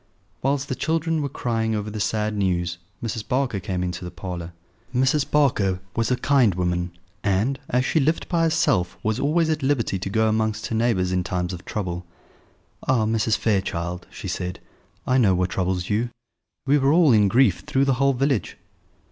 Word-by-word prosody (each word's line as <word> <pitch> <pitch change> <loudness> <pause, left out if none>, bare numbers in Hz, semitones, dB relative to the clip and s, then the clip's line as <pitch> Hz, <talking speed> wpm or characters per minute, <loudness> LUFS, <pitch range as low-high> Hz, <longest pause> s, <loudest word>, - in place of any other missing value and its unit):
Whilst 140 +1 0
the - - -2
children 160 +2 0
were 140 - -2
crying 115 -4 -1
over 105 0 -3
the 105 - -5
sad 105 +2 0
news 90 -3 0 0.2
Mrs. 110 -2 -4
Barker 125 -5 0
came 90 -1 -3
into 90 0 -4
the 90 - -5
parlour. 85 -1 -6 0.4
Mrs. 130 +3 +2
Barker 105 -11 +2 0.2
was 115 0 +1
a 125 - +3
kind 125 -8 +3
woman, 90 -1 -1 0.3
and, 105 +7 +1
as 125 +1 +1
she 160 - +2
lived 155 +3 +1
by 170 -2 +1
herself, 160 - +2
was 110 +2 0
always 160 +3 +2
at 155 - -1
liberty 130 -8 0
to 95 - -4
go 110 +2 +2
amongst 110 -1 0
her 115 - -2
neighbours 110 -6 +1
in 90 -1 +1
times 90 +1 -2
of 90 - -8
trouble. 90 -4 -3 0.8
"Ah, 125 -4 +3
Mrs. 110 0 +1
Fairchild," 90 -4 -1
she - - -8
said, 90 0 -3 0.5
"I 130 +1 +3
know 100 -6 +4
what 90 0 0
troubles 90 -1 -1
you: 115 +4 +1 0.6
we 140 +2 +4
are 135 0 +3
all 165 -3 +5
in 105 -3 +5
grief 115 -3 +4
through 140 -2 0
the 135 - +3
whole 140 0 +4
village." 135 -2 0
110 Hz, 185 wpm, -23 LUFS, 90-135 Hz, 0.8 s, all